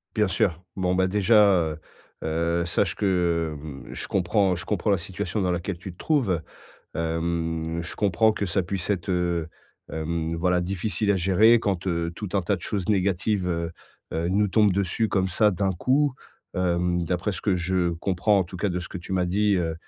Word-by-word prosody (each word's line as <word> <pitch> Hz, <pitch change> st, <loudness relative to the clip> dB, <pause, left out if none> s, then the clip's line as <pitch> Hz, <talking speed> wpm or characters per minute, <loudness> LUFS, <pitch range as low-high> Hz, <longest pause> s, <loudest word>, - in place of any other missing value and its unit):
Bien 105 Hz, -2 st, +3 dB
sûr. 90 Hz, -2 st, 0 dB
Bon 90 Hz, -1 st, +1 dB
bah, 95 Hz, 0 st, +3 dB
déjà, 105 Hz, +1 st, +5 dB, 0.2 s
heu 75 Hz, -, -6 dB, 0.5 s
heu, 85 Hz, +2 st, 0 dB
sache 85 Hz, -, 0 dB
que, 85 Hz, -5 st, +1 dB
hem, 70 Hz, -4 st, -9 dB
je -, -, -6 dB
comprends 95 Hz, 0 st, +2 dB
je 90 Hz, -, -7 dB
comprends 105 Hz, 0 st, 0 dB
la 100 Hz, -, +3 dB
situation 90 Hz, +3 st, -3 dB
dans 90 Hz, -1 st, +1 dB
laquelle 90 Hz, +1 st, -3 dB
tu 90 Hz, 0 st, -8 dB
te 90 Hz, -, -21 dB
trouves. 110 Hz, -, +1 dB, 0.5 s
Hem, 80 Hz, 0 st, -2 dB
je 90 Hz, -, -8 dB
comprends 110 Hz, +2 st, +3 dB
que 100 Hz, -2 st, -2 dB
ça 90 Hz, +2 st, 0 dB
puisse 90 Hz, +2 st, -3 dB
être, 95 Hz, -3 st, -1 dB
heu, 85 Hz, -3 st, 0 dB, 0.4 s
hem, 80 Hz, +1 st, -2 dB
voilà, 90 Hz, +1 st, +2 dB
difficile 95 Hz, +3 st, -1 dB
à 100 Hz, -, +3 dB
gérer 100 Hz, +6 st, +5 dB
quand, 100 Hz, -4 st, -2 dB
heu, 85 Hz, -2 st, -1 dB
tout 105 Hz, +3 st, -5 dB
un 95 Hz, -, +2 dB
tas 100 Hz, +3 st, 0 dB
de -, -, -12 dB
choses 100 Hz, -4 st, -3 dB
négatives, 100 Hz, -1 st, +1 dB
heu 85 Hz, -1 st, -2 dB, 0.4 s
heu, 85 Hz, +1 st, -1 dB
nous 100 Hz, +2 st, +2 dB
tombent 105 Hz, 0 st, +4 dB
dessus 100 Hz, +4 st, 0 dB
comme 95 Hz, -2 st, +1 dB
ça, 105 Hz, +4 st, +3 dB
d'un 95 Hz, 0 st, 0 dB
coup. 135 Hz, -, +1 dB, 0.4 s
Hem, 90 Hz, -1 st, +1 dB
d'après 90 Hz, +4 st, -1 dB
ce -, -, -5 dB
que 95 Hz, -4 st, +1 dB
je 90 Hz, 0 st, 0 dB
comprends, 95 Hz, +4 st, +1 dB
en -, -, 0 dB
tout 90 Hz, +2 st, -9 dB
cas, 100 Hz, +3 st, 0 dB
de 90 Hz, -, -2 dB
ce 85 Hz, -, -7 dB
que 95 Hz, -, -6 dB
tu 85 Hz, +2 st, -8 dB
m'as 90 Hz, -1 st, +2 dB
dit, 100 Hz, +3 st, +2 dB
heu 80 Hz, -2 st, -1 dB
90 Hz, 200 wpm, -25 LUFS, 85-100 Hz, 0.5 s, déjà